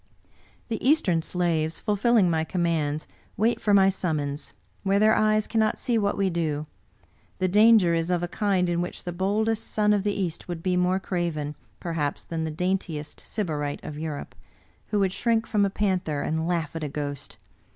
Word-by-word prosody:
" - - -33
" - - -34
The 225 - -3
Eastern 245 - +3
slaves, 165 -2 -1
fulfilling 215 -1 +3
my 160 -2 +1
commands, 160 - -1 0.3
wait 225 +3 +1
for 210 - +1
my 195 -1 +6
summons, 150 -6 -2 0.3
where 195 0 +2
their 215 +1 +5
eyes 215 0 +3
cannot 220 -1 +1
see 245 -3 -1
what 205 -2 +1
we 195 -2 +1
do. 155 -3 -1 0.7
The 185 - +1
danger 210 -2 +6
is 165 +1 0
of 175 -1 +1
a - - 0
kind 190 -1 +1
in 175 0 0
which 175 - -5
the 175 - -4
boldest 210 +5 0
son 210 -1 +2
of 205 - +2
the 205 -1 -1
East 175 -4 -3
would 170 -2 -5
be 185 -1 +1
more 180 +1 +2
craven, 170 -6 -2 0.3
perhaps, 160 -4 -2
that 165 -1 -3
the - - -2
daintiest 165 -2 -2
Sybarite 150 -8 -3
of 150 0 -6
Europe, 155 -2 -5 0.5
who 210 - -1
would 195 -2 +2
shrink 230 0 +1
from 210 -3 +2
a - - +1
panther 185 -7 -1
and 160 +1 -1
laugh 165 -3 -1
at 160 - -3
a 150 - -2
ghost. 145 -1 -5
180 Hz, 190 wpm, -26 LUFS, 160-205 Hz, 0.7 s, my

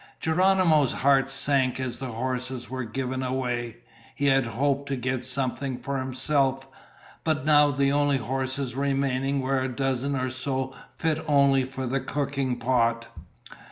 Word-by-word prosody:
Geronimo's 165 -4 +3
heart 135 0 +3
sank 135 -1 +2
as 130 -2 -3
the 135 - -4
horses 125 +1 -3
were 130 -1 -3
given 130 +3 -3
away. 125 -3 -2 0.4
He 145 - -1
had 135 -3 +3
hoped 140 +4 -1
to 140 - 0
get 130 0 -2
something 130 0 -2
for 135 +2 -3
himself, 135 +1 0 0.6
but 155 -4 0
now 150 -1 +5
the 140 0 +1
only 145 -1 +2
horses 130 +1 -2
remaining 135 0 0
were 130 0 0
a 130 - -1
dozen 135 +1 -1
or 130 -1 -1
so 130 0 -3 0.2
fit 160 -1 -1
only 140 -2 +4
for 130 0 -5
the 135 +2 0
cooking 135 -2 -2
pot. 115 -2 +1
135 Hz, 150 wpm, -26 LUFS, 130-140 Hz, 0.6 s, now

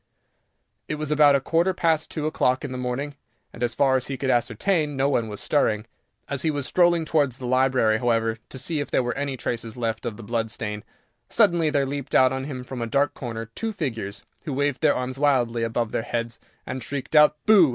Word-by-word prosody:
It 155 - -2
was 150 0 -4
about 150 -1 +6
a - - +3
quarter 170 +6 +1
past 160 -2 +1
two 155 -2 -4
o'clock 130 -4 +1
in 140 - -5
the 130 - -4
morning, 125 +4 -3 0.4
and, 120 - -11
as 120 -1 0
far 135 -2 +3
as 130 -1 0
he 135 - -4
could 130 +1 0
ascertain, 145 - +1
no 135 +1 +2
one 120 -5 +1
was 105 -1 -5
stirring. 110 -7 +1 0.4
As 140 -2 -2
he 160 - +1
was 145 -3 -1
strolling 175 0 +3
towards 145 -6 +1
the 125 - -7
library, 130 -3 +3
however, 115 -2 +1
to - - -8
see 155 +4 -1
if 145 - -3
there - - +2
were 120 - -2
any 140 -1 -3
traces 115 -1 -4
left 115 0 -2
of 110 -3 -5
the 115 - -9
blood 115 +1 -1
stain, 105 -2 -4 0.5
suddenly 175 -8 +3
there 140 -2 +1
leaped 140 0 -4
out 130 0 +5
on 135 0 -3
him 130 -3 -5
from 125 -1 -6
a 115 - -2
dark 140 +5 +1
corner 115 -3 -6
two 225 - -3
figures, 115 - -4 0.2
who 150 - -3
waved 145 0 0
their 155 -2 +4
arms 130 +1 -4
wildly 125 -5 +2
above 115 0 -1
their - - -1
heads, 115 0 -4 0.3
and 130 0 -5
shrieked 140 +5 -5
out 150 0 +6
"BOO!" 200 -8 +7
130 Hz, 225 wpm, -24 LUFS, 120-145 Hz, 0.5 s, BOO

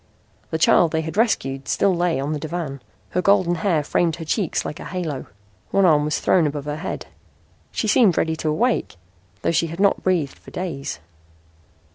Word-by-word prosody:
The 160 - -1
child 165 0 +4
they 160 - +1
had 160 +1 -6
rescued 135 - 0
still 190 -2 +2
lay 175 -4 +1
on 140 +3 -2
the 150 - -3
divan. 155 -4 -4 0.3
Her 180 - +1
golden 185 -2 +3
hair 165 -7 +2
framed 165 +2 +1
her 165 -1 -7
cheeks 175 +2 -1
like 150 - -5
a - - -8
halo. 165 -7 -4 0.4
One 195 -1 +3
arm 150 -4 +4
was 150 - 0
thrown 170 -4 +3
above 145 -1 -4
her 150 0 -3
head. 155 - -5 0.7
She 220 - -2
seemed 210 -4 +4
ready 160 0 +1
to 155 - -1
awake, 230 - 0 0.5
though - - +2
she 170 0 +1
had 165 +2 -7
not 200 0 +3
breathed 170 -7 0
for - - -14
days. 165 -7 -4
165 Hz, 190 wpm, -22 LUFS, 150-185 Hz, 0.7 s, child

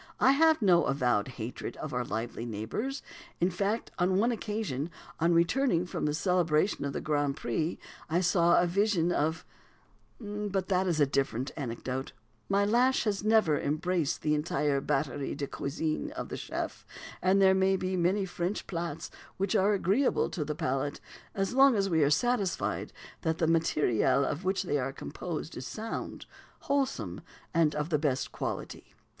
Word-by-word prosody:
I 265 - +6
have 315 -1 +4
no 175 -5 +5
"avowed 125 -7 +1
hatred" 120 +1 -5
of 155 - -6
our 125 0 0
lively 115 +1 -4
neighbours; 120 - -4 0.4
in 175 +2 +2
fact, 200 +5 -1
upon 185 +1 +2
one 230 +5 +3
occasion 210 - -3 0.3
on 165 +1 +3
returning 175 +1 +2
from 175 - -3
the 150 - 0
celebration 175 -1 +1
of 140 - -3
the - - -3
Grand 145 -2 0
Prix, 155 +8 -2 0.3
I 165 +3 +2
saw 175 -1 +4
a 175 - +3
vision 180 -1 +2
of 160 +1 0 0.7
but 205 -3 -3
that 190 0 +2
is 170 -3 +1
a 145 - +6
different 135 -1 -1
anecdote. 130 -1 -4 0.4
My 200 +1 +3
lash 245 +5 +3
has 205 -2 -1
never 215 -9 +4
embraced 155 +1 -1
the 150 - +2
entire 150 -2 0
batterie 135 0 -1
de 145 - -2
cuisine 155 - -3
of 325 - -5
the - - -4
chef, - - -5 0.4
and 190 +2 +3
there 190 -1 +6
be 190 0 +1
many 185 +3 +1
French 180 +2 -3
plats 170 -3 -4 0.3
which 195 0 0
are 200 +2 +4
agreeable 200 +7 +2
to 165 - -2
the 150 +1 -3
palate, 135 0 -2 0.4
as 195 +2 -1
long 270 -1 +6
as 195 -2 +1
we 160 -1 +3
are 140 - +4
satisfied 205 +3 0 0.3
that 160 0 0
the 165 - +1
matériel 145 -5 +2
of 150 +6 -3
which 190 +1 +1
they 145 -6 0
are 130 +1 -2
composed 165 +3 -6
is 130 - -5
sound, 225 +1 -5 0.4
wholesome, 275 -1 -1 0.3
and 160 -2 +3
of 150 +1 -2
the 150 -3 +2
best 140 -4 -1
quality. - - -5
170 Hz, 165 wpm, -30 LUFS, 145-195 Hz, 0.7 s, I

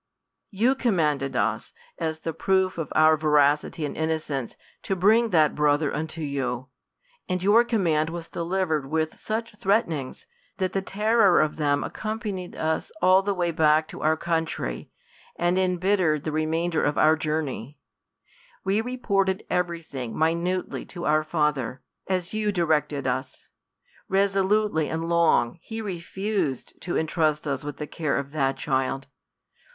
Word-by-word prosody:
You 225 +6 +2
commanded 150 - 0
us, 110 0 -1 0.3
as 160 -1 -2
the 165 - -3
proof 190 +2 +1
of 155 - -4
our 155 0 +6
veracity 150 +1 +2
and 145 - -5
innocence, 155 -5 -2 0.3
to 195 - -2
bring 220 +5 +4
that 155 -6 +4
brother 150 0 +2
unto 160 +2 -4
you 130 -3 -3 0.3
\ - - -37
and 180 0 -1
your 210 +4 +6
command 170 -10 +1
w^s 170 0 -7
delivered 170 -4 -1
with 160 0 -1
such 225 0 -4
threatenings, 195 - 0 0.3
that 185 -2 -1
the 195 - 0
terror 210 0 +3
of 155 0 +1
them 145 -2 +1
accompanied 215 -4 -4
us 160 0 -1
all 185 0 +5
the 200 0 -1
way 175 -2 0
back 155 -1 +3
to - - -8
our 155 +1 +2
country, 160 - -2 0.5
and 175 +2 +1
imbittered 180 -4 +1
the 155 - -2
remainder 160 +2 0
of 145 - 0
our 155 +1 +5
jour 155 0 -1
ney. 135 0 -7 0.9
We 195 +3 +1
reported 200 -6 0
^very 170 -2 -1
thing 125 -6 -6
minutely 170 +3 0
to 175 -1 -7
our 155 +1 +3
father, 150 -6 -1 0.2
as 185 -1 -1
you 215 -1 0
directed 155 -6 0
us. 130 +1 -3 0.6
Resolutely 195 -3 +2
and 165 +1 -3
long, 170 -5 +2
he 225 0 -6
refused 190 - -3
to 175 - -3
intrust 155 -1 0
us 140 -1 -2
with 145 0 -6
the 150 - -4
care 150 -1 -2
of 140 0 -4
that 135 -3 0
child. 135 -2 -1
165 Hz, 150 wpm, -25 LUFS, 150-190 Hz, 0.9 s, our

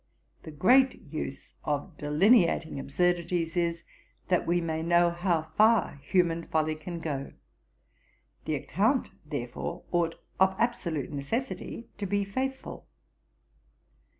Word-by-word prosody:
The - - -9
great 250 - +4 0.2
use 135 -3 -5
of 150 +3 -2
delineating 165 - +3
absurdities 170 +3 0
is, 170 -1 0 0.5
that 180 - +2
we 175 +1 +3
may 160 -2 -2
know 170 +1 +4
how 170 -2 -1
far 215 -9 +4
human 170 -2 +2
folly 155 -1 0
can 165 +2 -6
go; 145 -4 -4 1.1
the 155 - 0
account, 215 - +1
therefore, 150 +4 -5
ought 170 -2 +1 0.2
of 190 0 +4
absolute 185 - -1
necessity 230 - -4
to 200 - -2
be 200 +1 0
faithful. 265 +6 -4
170 Hz, 115 wpm, -29 LUFS, 155-195 Hz, 1.1 s, great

